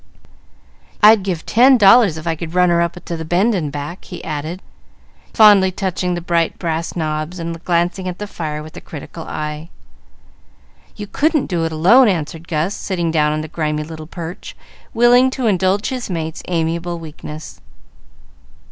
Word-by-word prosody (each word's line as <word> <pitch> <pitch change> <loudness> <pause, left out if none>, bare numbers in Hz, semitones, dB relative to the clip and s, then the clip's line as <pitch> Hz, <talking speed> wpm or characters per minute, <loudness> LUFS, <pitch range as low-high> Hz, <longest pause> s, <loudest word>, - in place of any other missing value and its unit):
"I'd 215 0 +8
give 185 -4 -4
ten 255 +3 +5
dollars 205 -4 +6
if 160 - -8
I 165 -1 0
could 165 +1 -7
run 180 0 +4
her 170 0 +3
up 170 0 0
to 170 - -4
the 160 - -5
bend 180 +8 +1
and 160 -7 -2
back," 145 +5 -7
he 180 - -9
added, 155 +4 -5 0.7
fondly 205 -4 +6
touching 180 -1 -2
the 175 - -4
bright 170 -1 0
brass 165 -1 -3
knobs 155 +1 -3
and 165 0 -6
glancing 175 +2 0
at 180 -1 -4
the 210 - -5
fire 155 -6 -5
with 155 - -12
a - - -8
critical 160 +2 -9
eye. 150 +2 -5 1.3
"You 210 - -6
couldn't 300 +7 +1
do 170 -3 -1
it 165 - -2
alone," 195 +12 +5
answered 165 -3 -2
Gus, 165 +4 -1
sitting 175 -4 -2
down 150 -2 +2
on 155 0 -2
the 155 - -6
grimy 150 -1 -2
little 155 0 -9
perch, 170 0 -8 0.3
willing 245 +2 +5
to 260 -1 -4
indulge 195 0 +1
his 255 -4 -5
mate's 160 -3 -4
amiable 170 0 -2
weakness. 155 -1 -9
170 Hz, 170 wpm, -18 LUFS, 160-195 Hz, 1.3 s, I'd